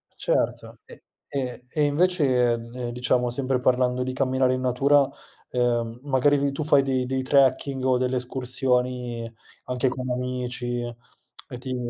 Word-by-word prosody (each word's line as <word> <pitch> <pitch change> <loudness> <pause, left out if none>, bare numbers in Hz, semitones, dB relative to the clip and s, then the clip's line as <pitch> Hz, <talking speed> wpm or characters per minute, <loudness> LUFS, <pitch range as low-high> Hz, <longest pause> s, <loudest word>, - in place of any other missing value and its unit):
Certo. - - -1
E - - -14 0.3
e 130 -3 -3
e 150 - +2
invece, 145 -6 +2
ehm, 120 +1 -5
diciamo, 125 0 0
sempre 130 +1 -1
parlando 125 0 +2
di 130 0 -2
camminare 130 -1 +1
in 130 - -4
natura, 135 +2 +3 0.4
uhm, 120 -1 0
magari 145 +1 +3
ri 140 0 0
tu 150 +2 -3
fai 145 -2 +5
dei 130 -2 0
dei 130 +1 -1
trekking 135 0 +2
o 130 -1 +3
delle 130 0 0
escursioni, 125 -2 -1 0.3
anche 125 +1 0
con 130 0 -5
amici, 125 -1 -3 0.5
e 125 -4 -12
ti 130 0 -4
125 Hz, 145 wpm, -25 LUFS, 125-135 Hz, 0.5 s, fai